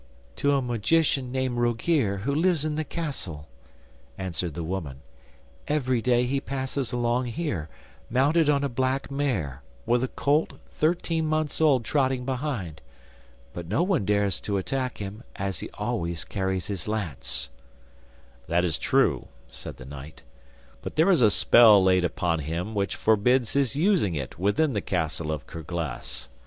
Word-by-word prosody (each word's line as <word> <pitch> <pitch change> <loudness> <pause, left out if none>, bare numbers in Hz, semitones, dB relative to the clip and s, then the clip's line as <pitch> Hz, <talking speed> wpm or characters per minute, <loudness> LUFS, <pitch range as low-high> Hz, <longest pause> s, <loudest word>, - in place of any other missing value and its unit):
'To 140 0 +2
a 135 - +2
magician 130 +3 +1
named 130 -2 -1
Rogear 120 - +1
who 140 +7 -1
lives 160 0 +2
in 155 - -1
the 155 +1 -1
castle,' 135 - -5 0.7
answered 90 -4 -3
the 85 - -3
woman. 80 -6 -4 0.7
'Every 130 -5 +1
day 125 0 +3
he 135 +2 -1
passes 135 -1 -3
along 120 0 0
here, 120 - -3 0.4
mounted 145 +5 +3
on 140 -1 +3
a - - +2
black 130 +2 -1
mare, 105 - -1 0.2
with 120 +1 +2
a - - +1
colt 145 +4 +1 0.2
thirteen 165 0 0
months 155 0 0
old 135 -7 +4
trotting 130 -2 +1
behind. 125 - -3 0.7
But 85 -1 -6
no 110 - +1
one 180 - +1
dares 100 -2 +1
to 100 -1 -1
attack 130 +6 -2
him, 100 +2 -6
as 95 -1 -3
he - - -6
always 85 -8 -2
carries 95 +2 -2
his 95 -6 -4
lance.' 90 - -3 1.0
'That 85 +2 +2
is 80 -7 +1
true,' - - +2 0.2
said 60 - -9
the 65 - -10
knight, 70 +2 -10 0.6
'but - - -6
there 165 +5 +4
is 175 - +4
a 110 - +7
spell 105 -1 +7
laid 95 -1 +4
upon 85 -1 0
him 85 +8 -3
which 100 -1 -1
forbids 115 +3 +2
his 140 -2 +1
using 160 - +2
it 70 +1 -5
within 135 - +2
the 105 - -1
castle 80 -3 -2
of 75 -2 -4
Kerglas. 80 -3 -5
120 Hz, 155 wpm, -26 LUFS, 90-140 Hz, 1.0 s, a